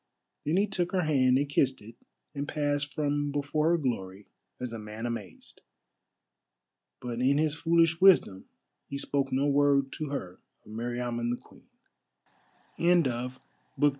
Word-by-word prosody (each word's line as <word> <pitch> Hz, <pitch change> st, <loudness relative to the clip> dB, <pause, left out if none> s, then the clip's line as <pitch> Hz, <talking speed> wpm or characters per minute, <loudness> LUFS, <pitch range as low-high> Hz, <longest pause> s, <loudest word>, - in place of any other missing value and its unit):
Then 155 Hz, +5 st, +1 dB
he 200 Hz, -, +4 dB
took 180 Hz, -3 st, -1 dB
her 185 Hz, -1 st, +2 dB
hand 130 Hz, -4 st, +3 dB
and 145 Hz, +1 st, 0 dB
kissed 135 Hz, -2 st, +1 dB
it 110 Hz, +3 st, -12 dB, 0.4 s
and 145 Hz, 0 st, -4 dB
passed 145 Hz, -1 st, -1 dB
from 145 Hz, -1 st, -1 dB
before 145 Hz, +2 st, 0 dB
her 170 Hz, -, +3 dB
glory 100 Hz, -, -3 dB, 0.3 s
as 125 Hz, -2 st, -5 dB
a 115 Hz, -, -5 dB
man 105 Hz, +2 st, -7 dB
amazed. 110 Hz, -8 st, -7 dB, 1.4 s
But 120 Hz, -1 st, -4 dB
in 135 Hz, +2 st, +3 dB
his 155 Hz, -1 st, +1 dB
foolish 165 Hz, +1 st, +2 dB
wisdom 175 Hz, -, +5 dB, 0.4 s
he 140 Hz, -, -5 dB
spoke 140 Hz, -1 st, -1 dB
no 135 Hz, +2 st, +1 dB
word 140 Hz, -1 st, +3 dB
to 155 Hz, -2 st, -3 dB
her 95 Hz, -11 st, -5 dB, 0.3 s
of -, -, -13 dB
Meriamun 120 Hz, +1 st, -3 dB
the 120 Hz, -, -1 dB
Queen. -, -, -20 dB, 1.1 s
CHAPTER 130 Hz, -8 st, +2 dB, 0.4 s
VIII. 145 Hz, -, +5 dB
140 Hz, 150 wpm, -29 LUFS, 120-150 Hz, 1.4 s, wisdom